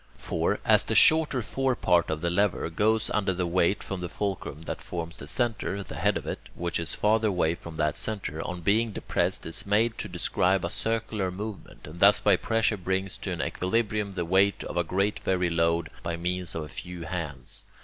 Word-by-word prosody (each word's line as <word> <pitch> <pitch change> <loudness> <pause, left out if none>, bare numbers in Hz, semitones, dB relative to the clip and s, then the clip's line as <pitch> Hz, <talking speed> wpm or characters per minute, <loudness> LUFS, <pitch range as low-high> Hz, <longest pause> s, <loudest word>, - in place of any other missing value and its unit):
For, - - -1
as - - +5
the - - -1
shorter 155 -6 +5
fore 135 +3 0
part 90 -5 +2
of 80 0 -2
the 85 0 0
lever 95 -3 +1
goes 110 +5 +1
under 95 -3 +1
the 90 0 0
weight 90 +3 +1
from 95 -2 -5
the 90 - -4
fulcrum 95 -7 -4
that - - -5
forms 85 -1 -5
the - - -8
centre, 110 -5 -1
the - - -9
head - - +1
of - - -7
it, - - -3 0.2
which 85 -1 -2
is 85 - -3
farther 110 +1 +2
away 85 -5 +2
from 85 -1 -9
that 75 -1 0
centre, 95 -8 -3
on 90 +1 -5
being 110 +5 +2
depressed, - - -1
is 80 - -2
made 110 +3 +1
to - - -3
describe 95 +1 +1
a 85 - -3
circular 110 -3 -1
movement, 100 +2 -7
and 80 +3 -10
thus 100 +3 +6
by 100 -2 +5
pressure 110 +2 +1
brings 95 +1 -2
to - - -4
an - - -2
equilibrium 105 0 -1
the 90 -2 -1
weight 95 +3 +3
of - - -6
a 85 - +3
very 95 +4 +1
great 95 -3 -1
load 85 0 +1
by 85 -1 -3
means 90 +1 -3
of 80 - -2
a - - -7
few 85 +3 -7
hands. 75 -8 -5
95 Hz, 210 wpm, -27 LUFS, 85-105 Hz, 0.2 s, thus